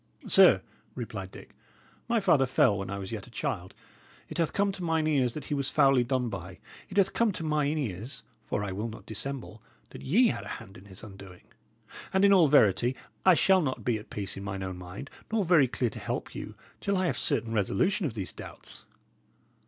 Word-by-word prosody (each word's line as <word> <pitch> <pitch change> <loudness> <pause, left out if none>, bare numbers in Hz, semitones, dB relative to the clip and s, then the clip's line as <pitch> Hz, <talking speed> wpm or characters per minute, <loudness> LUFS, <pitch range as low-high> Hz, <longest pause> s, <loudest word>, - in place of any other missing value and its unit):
"Sir," - - +6 0.3
replied - - -5
Dick, - - -13 0.6
"my 235 -1 +3
father 160 -10 +3
fell 105 -4 +3
when 95 -1 -4
I 100 - -3
was 95 -1 -6
yet 105 -4 -6
a - - -14
child. 95 -5 -4 0.5
It - - -6
hath 165 - +1
come 200 0 +1
to 190 -2 -7
mine 160 -2 +1
ears 135 -6 +1
that 150 - -5
he 145 - -4
was 140 -1 0
foully 135 -4 +4
done 125 0 0
by. - - -7 0.3
It 195 - -7
hath 195 -1 +4
come 230 -2 +2
to 165 - -6
mine 150 -1 0
ears 115 -2 -5 0.2
for 100 - -3
I 100 - -3
will 105 +5 -3
not 115 - -10
dissemble 110 -1 -6 0.3
that - - -10
ye 225 - +4
had - - -3
a - - -9
hand 95 - -13
in 95 - -13
his 95 0 -13
undoing. 95 -3 -12 0.7
And 190 +1 +4
in 200 - +6
all 175 -5 +6
verity, 120 -2 +4 0.3
I 185 - +8
shall 190 +2 +4
not 130 -5 -3
be 115 -3 +1
at 105 - -14
peace 100 -2 -5
in 100 - -7
mine 95 -1 -4
own 95 -1 -5
mind, 95 - -9 0.2
nor 220 -3 +1
very 165 -6 +5
clear 120 -1 -1
to - - -8
help - - -4
you, - - -7 0.2
till 200 -1 0
I 185 - +1
have - - 0
certain 115 -6 0
resolution 180 - +1
of 120 - -7
these 95 -4 -5
doubts." - - -11
130 Hz, 215 wpm, -29 LUFS, 100-165 Hz, 0.7 s, I